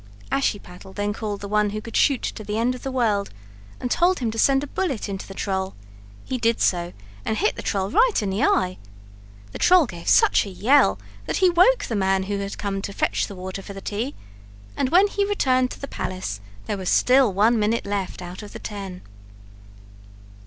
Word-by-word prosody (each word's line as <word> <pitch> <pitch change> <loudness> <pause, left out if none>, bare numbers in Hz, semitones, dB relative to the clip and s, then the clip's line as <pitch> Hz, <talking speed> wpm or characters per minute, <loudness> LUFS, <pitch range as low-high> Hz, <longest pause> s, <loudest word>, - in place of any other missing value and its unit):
Ashiepattle 190 -7 -2
then 205 +1 -2
called 210 -2 -4
the 200 - -5
one 210 0 +2
who 215 +1 -4
could 230 +2 -9
shoot 275 -4 +3
to 215 - -4
the 210 +1 -3
end 240 +3 +1
of 250 - -9
the 270 - -4
world 215 -6 +1 0.5
and 245 - -3
told 360 +2 +3
him 235 -4 -1
to 225 - -5
send 275 +2 +4
a - - -2
bullet 285 - -2
into 195 -1 -5
the 195 - -10
troll; 190 -1 -2 0.5
he 255 - -3
did 230 0 +1
so 175 -1 +1 0.3
and 220 - -1
hit 420 +5 +1
the - - -6
troll 195 -1 -1
right 475 - +4
in 205 -3 -2
the 200 +5 -1
eye. 185 -8 +1 0.7
The - - -8
troll 360 -3 +6
gave 175 -7 -9
such - - +5
a - - -6
yell 195 - +3 0.3
that - - -1
he 370 -2 +4
woke 370 +9 +4
the 230 - -3
man 190 -1 +1
who 200 +1 -3
had 200 0 -5
come 195 -1 -3
to 200 - -5
fetch - - 0
the 200 - -9
water 185 +1 -6
for 200 - -9
the 195 - -7
tea, 220 +8 -4 0.6
and 260 - 0
when 365 +6 +6
he 405 0 0
returned 255 -11 +2
to - - -9
the 280 - -6
palace 145 - -5 0.2
there 200 - -2
was 185 -2 -3
still 255 -3 +4
one 215 +5 +3
minute 215 +2 0
left 200 -2 -3
out 180 +3 -8
of 210 - -10
the - - -6
ten. 195 -3 -7
210 Hz, 215 wpm, -23 LUFS, 195-255 Hz, 0.7 s, troll